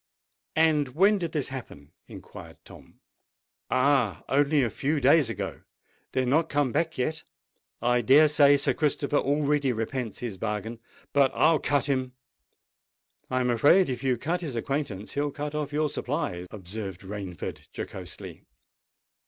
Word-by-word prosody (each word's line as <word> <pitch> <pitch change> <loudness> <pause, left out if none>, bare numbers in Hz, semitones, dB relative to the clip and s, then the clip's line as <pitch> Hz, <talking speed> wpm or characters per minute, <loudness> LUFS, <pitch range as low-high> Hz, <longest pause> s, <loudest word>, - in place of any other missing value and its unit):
"And 150 -5 +2
when 200 +4 +4
did 170 -3 -3
this 150 -4 -2
happen?" 100 - -9 0.2
inquired - - -11
Tom. - - -16 0.7
"Oh! 130 - +2
only 145 +1 +3
a 115 - -1
few 145 +2 -1
days 140 -1 +4
ago. 115 - -5 0.5
They 130 - +1
are - - -1
not 150 +6 +2
come 145 -3 +1
back 165 +3 -1
yet. 155 +5 -1 0.6
I 120 0 +3
dare 140 +6 +6
say 145 -1 +5
Sir 140 - +1
Christopher 145 -1 0
already 145 -1 +1
repents 115 0 -3
his 115 -6 -5
bargain. 110 +1 -3 0.3
But 140 -2 +4
I'll 160 -2 +4
cut 145 -1 +1
him!" 130 -3 -1 1.2
"I'm 130 -1 +1
afraid 145 +10 +4
if 125 -1 -4
you 130 -2 +1
cut 170 +9 -2
his 150 -8 -5
acquaintance, 115 -5 -3
he'll 145 +1 -1
cut 145 +1 -5
off 150 -1 -3
your 150 +1 +1
supplies," 125 - -3
observed 95 -1 -7
Rainford 95 -3 -7
jocosely. - - -7
135 Hz, 145 wpm, -27 LUFS, 120-150 Hz, 1.2 s, dare